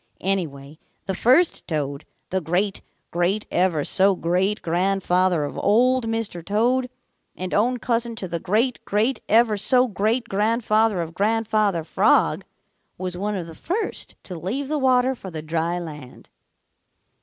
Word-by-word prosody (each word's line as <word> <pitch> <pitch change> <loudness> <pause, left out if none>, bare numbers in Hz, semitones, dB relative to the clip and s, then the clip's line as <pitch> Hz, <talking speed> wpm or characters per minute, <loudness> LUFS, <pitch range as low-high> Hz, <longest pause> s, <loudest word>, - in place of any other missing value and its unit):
Anyway, 155 -6 -3 0.3
the 190 - -2
first 260 - +3
Toad, 145 -4 -3 0.3
the 190 0 0
great 180 +5 -1 0.3
great 180 +5 0
ever 175 -5 +1
so 195 +4 +3
great 185 +5 0
grandfather 180 -1 +1
of 145 - -5
Old 250 +3 +3
Mr. 225 -6 -3
Toad 245 +7 +1 0.5
and 185 0 -5
own 245 +5 +2
cousin 235 -1 -1
to 195 - -5
the 170 -1 -3
great 230 +8 0
great 220 +6 0
ever 220 -1 +4
so 250 +5 +4
great 225 +3 0
grandfather 215 -2 +1
of 165 0 -9
Grandfather 210 -3 +1
Frog, 155 - +2 0.5
was 180 -1 -4
one 205 +3 -2
of 180 -3 -4
the 165 - -10
first 380 - -3
to 185 - -8
leave 205 - -3
the 305 -1 0
water 260 -1 +3
for 200 -7 -9
the 160 -3 -6
dry 165 +2 -1
land. 150 -7 -9
195 Hz, 145 wpm, -23 LUFS, 175-230 Hz, 0.5 s, ever